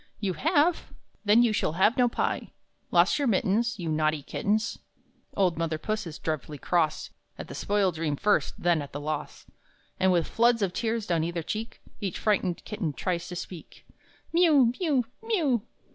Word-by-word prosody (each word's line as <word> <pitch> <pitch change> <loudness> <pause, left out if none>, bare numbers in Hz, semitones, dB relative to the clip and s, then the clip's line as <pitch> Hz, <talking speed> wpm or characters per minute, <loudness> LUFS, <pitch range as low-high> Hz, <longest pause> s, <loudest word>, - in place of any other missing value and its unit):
"You 195 -4 -1
have? 320 - +1 0.3
Then 215 +4 +6
you 230 -3 +2
shall 155 - 0
have 190 +7 +3
no 245 -1 +3
pie! - - -2 0.4
Lost - - +4
your 285 - +1
mittens? 220 +2 +1
You 175 -4 -5
naughty 155 -1 0
kittens!" 215 +7 -1 0.6
Old 180 -4 +2
mother 165 -1 -1
Puss 215 +3 -3
is 155 - -7
dreadfully 155 -1 -4
cross, 160 0 0 0.3
At - - -7
the - - -7
spoiled 200 -3 +1
dream 155 -2 -1
first, 205 +8 +1
then 170 -3 +2
at 140 -1 -9
the 145 - -4
loss; 150 0 -5 0.5
And 190 0 +4
with 175 -2 +2
floods 235 -1 +3
of 185 -3 -1
tears 225 0 -1
down 170 -4 +1
either 170 0 -3
cheek 220 +7 -5 0.2
Each 195 -4 -3
frightened 190 -5 0
kitten 205 -8 -3
tries 175 +2 -2
to 180 - -6
speak: 175 -1 -9 0.5
"Miew, 300 -9 +5
miew, 290 -9 +1 0.2
miew! 335 - +1
195 Hz, 175 wpm, -27 LUFS, 165-235 Hz, 0.6 s, Then